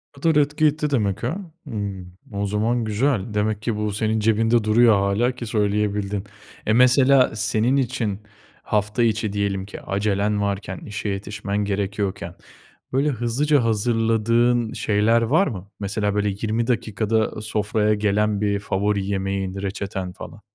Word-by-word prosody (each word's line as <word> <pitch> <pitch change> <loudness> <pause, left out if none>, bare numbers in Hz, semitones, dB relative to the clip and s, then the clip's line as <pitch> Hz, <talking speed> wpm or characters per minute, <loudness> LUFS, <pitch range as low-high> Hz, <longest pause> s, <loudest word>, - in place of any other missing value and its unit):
O 140 - -15
kadar 165 -1 +3
etki 150 +2 +1
etti 150 0 +1
demek 105 -8 0
ha. 130 +10 -1 0.3
Hımm, 100 -6 -5 0.2
o 100 0 -1
zaman 110 +4 0
güzel. 110 -1 0
Demek 105 0 0
ki 115 0 -1
bu 105 0 -1
senin 110 +2 0
cebinde 115 +1 +2
duruyor 110 +1 +5
hâlâ 100 +5 +1
ki 125 -1 -7
söyleyebildin. 105 -2 0 0.4
E, 110 - +2
mesela 130 +1 +5
senin 110 +3 +1
için 120 -6 -1 0.4
hafta 105 +3 0
içi 110 -2 0
diyelim 100 -2 -1
ki 100 - -9
acelen 105 +1 0
varken, 100 -2 -2
işe 105 0 -5
yetişmen 100 +1 -4
gerekiyorken 100 -1 -3 0.6
böyle 140 +3 +2
hızlıca 135 +3 +1
hazırladığın 115 +1 +2
şeyler 115 -1 +2
var 145 - +3
mı? 100 -8 -6
Mesela 105 0 -1
böyle 105 0 +1
20 110 +3 -2
dakikada 110 -2 0
sofraya 105 0 0
gelen 105 0 +1
bir 100 -1 +1
favori 100 0 -1
yemeğin, 95 -1 -2
reçeten 95 -2 -4
falan? - - -10
105 Hz, 145 wpm, -22 LUFS, 100-115 Hz, 0.6 s, duruyor